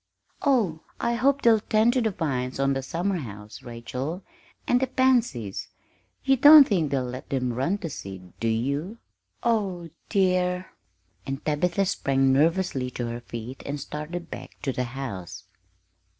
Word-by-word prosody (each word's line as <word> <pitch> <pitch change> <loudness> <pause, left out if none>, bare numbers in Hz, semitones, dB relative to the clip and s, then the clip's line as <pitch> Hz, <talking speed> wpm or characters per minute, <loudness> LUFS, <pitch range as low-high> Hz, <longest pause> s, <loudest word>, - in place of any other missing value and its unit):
"Oh, 215 - +2 0.2
I 235 - 0
hope 275 +4 +2
they'll 225 -2 +6
tend 220 +3 +3
to 255 - +2
the 225 - +2
vines 130 -9 -2
on 135 0 +2
the 135 - -2
summerhouse, 130 - -4
Rachel, 125 +9 -5 0.4
and 245 - +4
the 265 - +1
pansies 240 - +1 0.6
you 270 0 +3
don't 290 +2 +10
think 170 -8 +1
they'll 135 -2 0
let 125 +1 -7
them 125 -3 -1
run 135 +11 0
to 185 -6 -5
seed, 95 -6 -9
do 115 - -1
you? 140 - -1 0.5
Oh, 195 -8 0 0.2
dear!" 180 -2 +1 0.6
And 135 +2 -4
Tabitha 175 +6 +1
sprang 135 -7 +2
nervously 155 -3 +2
to 120 -1 -4
her 120 +1 -5
feet 120 +2 -7
and 145 +1 -4
started 155 +5 -6
back - - -9
to 135 - -1
the 125 - -1
house. 105 -6 -6
150 Hz, 150 wpm, -26 LUFS, 125-200 Hz, 0.6 s, don't